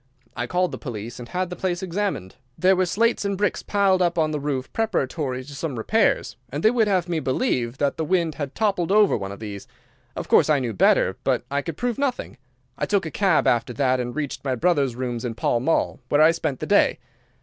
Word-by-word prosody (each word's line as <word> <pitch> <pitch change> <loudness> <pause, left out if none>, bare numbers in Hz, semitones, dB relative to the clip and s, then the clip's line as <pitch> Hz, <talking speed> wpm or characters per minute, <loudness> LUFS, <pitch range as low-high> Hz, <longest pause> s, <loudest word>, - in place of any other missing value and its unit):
I 120 +1 -3
called 180 +3 0
the - - -6
police 120 -2 -7
and 120 - -9
had 180 0 -2
the - - -4
place 180 -1 -2
examined. 185 - -3 0.2
There 190 +1 +4
were 185 0 +1
slates 230 +7 +1
and 200 -1 -1
bricks 205 +1 0
piled 195 -2 +2
up 175 -1 +1
on 155 -1 +2
the 150 - -2
roof 140 -3 -3
preparatory 145 - -1
to 140 +2 -11
some 140 -1 -4
repairs, 215 - +1
and 145 +5 -4
they 220 - +6
would 230 -3 +2
have 185 -3 +1
me 170 -2 -1
believe 130 - -1
that 140 0 0
the 160 - -1
wind 170 -1 +1
had 145 -3 -6
toppled 195 -5 0
over 210 -1 +5
one 100 -2 -4
of 100 - -9
these. 100 -2 -7 0.5
Of - - -5
course - - +4
I 150 - +4
knew 125 -4 -2
better, 95 - +3
but - - +1
I 140 0 0
could 165 0 -6
prove 245 -1 -2
nothing. 275 -3 -2 0.4
I - - -1
took 200 -4 +1
a 160 - -5
cab 190 -2 +2
after 120 0 +1
that 130 -1 +1
and 120 0 -4
reached 145 -3 -4
my 130 -2 -1
brother's 140 -4 +1
rooms 120 -2 -3
in 120 -2 -3
Pall 120 - +1
Mall, 160 +7 0
where 145 - +3
I 155 +1 +7
spent 155 -5 -3
the - - -2
day. - - +3
155 Hz, 230 wpm, -23 LUFS, 130-185 Hz, 0.5 s, I